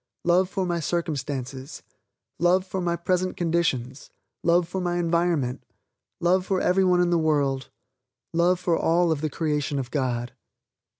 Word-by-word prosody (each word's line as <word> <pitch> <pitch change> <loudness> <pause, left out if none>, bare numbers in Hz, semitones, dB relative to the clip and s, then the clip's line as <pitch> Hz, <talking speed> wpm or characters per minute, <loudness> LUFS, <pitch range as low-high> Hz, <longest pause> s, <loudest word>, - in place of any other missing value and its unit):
Love 180 +2 +3
for 190 -1 -2
my 175 -1 -1
circumstances, 140 -5 -4 0.6
love 180 +2 +3
for 190 0 -4
my 170 -1 0
present 185 +1 -1
conditions, 160 -7 -1 0.3
love 170 0 +3
for 185 +2 -3
my 175 -1 -1
environment, 170 -6 0 0.6
love 180 +2 +2
for 190 0 0
every 185 +2 +2
one 180 -1 +3
in 175 -1 +2
the 170 - +3
world, 140 -4 0 0.6
love 175 +2 +3
for 180 -2 +1
all 170 +1 +2
of 150 -3 -1
the 155 - -1
creation 150 -1 -1
of 130 -2 -4
God. 125 -4 -2
170 Hz, 155 wpm, -25 LUFS, 145-180 Hz, 0.6 s, Love